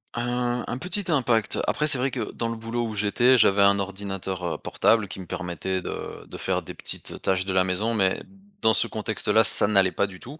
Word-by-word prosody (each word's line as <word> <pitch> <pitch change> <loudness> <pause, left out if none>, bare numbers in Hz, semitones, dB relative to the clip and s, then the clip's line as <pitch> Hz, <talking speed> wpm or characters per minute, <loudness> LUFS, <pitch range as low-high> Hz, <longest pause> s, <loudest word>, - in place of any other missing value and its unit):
Un 120 0 -2
un 125 - -4
petit 185 +3 -3
impact. 120 -7 0
Après, 150 - 0
c'est 140 -4 +7
vrai 130 +2 0
que 120 -4 -5
dans 115 - -4
le 115 - -4
boulot 115 +1 -4
où 110 - -6
j'étais, 120 +5 +3
j'avais 100 -3 +3
un 100 0 +4
ordinateur, 95 -1 -5
heu, - - -6
portable 110 -3 +1
qui 95 - -9
me 90 - -9
permettait 90 +1 -4
de - - -7
de - - -10
faire - - -2
des - - -9
petites, - - -3
heu, - - -9
tâches 95 -1 -1
de 95 - -3
la 95 0 +3
maison. 95 +5 -1
Mais 95 -4 0 0.4
dans 110 - +4
ce - - +4
contexte-là, 110 0 +1
ça 100 - +7
n'allait 95 -3 +3
pas 100 - -1
du 95 -2 -13
tout. 145 +6 -11
105 Hz, 230 wpm, -24 LUFS, 95-120 Hz, 0.4 s, c'est